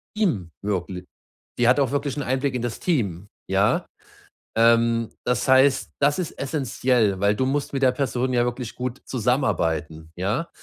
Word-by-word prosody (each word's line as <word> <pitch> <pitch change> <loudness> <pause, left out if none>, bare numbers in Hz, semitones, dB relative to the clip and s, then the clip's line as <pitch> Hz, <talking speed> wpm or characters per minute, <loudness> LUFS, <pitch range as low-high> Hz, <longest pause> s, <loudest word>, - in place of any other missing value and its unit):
ihm 120 - 0
wirkli 95 -2 -3 0.5
die 120 -1 +4
hat 125 - +5
auch 135 -4 +1
wirklich 140 -1 -1
'n 145 - -2
Einblick 130 +1 -1
in 125 - -2
das 120 -2 -4
Team“, 100 - -1 0.2
ja? - - +2 0.7
Ähm, 115 0 +3 0.2
das 125 +1 0
heißt, 130 +1 +4
das 145 +4 +2
ist 175 -4 -3
essenziell, 125 -7 0
weil 100 +1 +3
du 130 - 0
musst 140 +1 -2
mit 135 - -1
der 130 -2 +5
Person 130 -1 -1
ja 120 -1 +3
wirklich 120 -1 -4
gut 125 0 -5
zusammenarbeiten, 80 - -1
ja? 105 - -2
125 Hz, 165 wpm, -23 LUFS, 105-135 Hz, 0.7 s, hat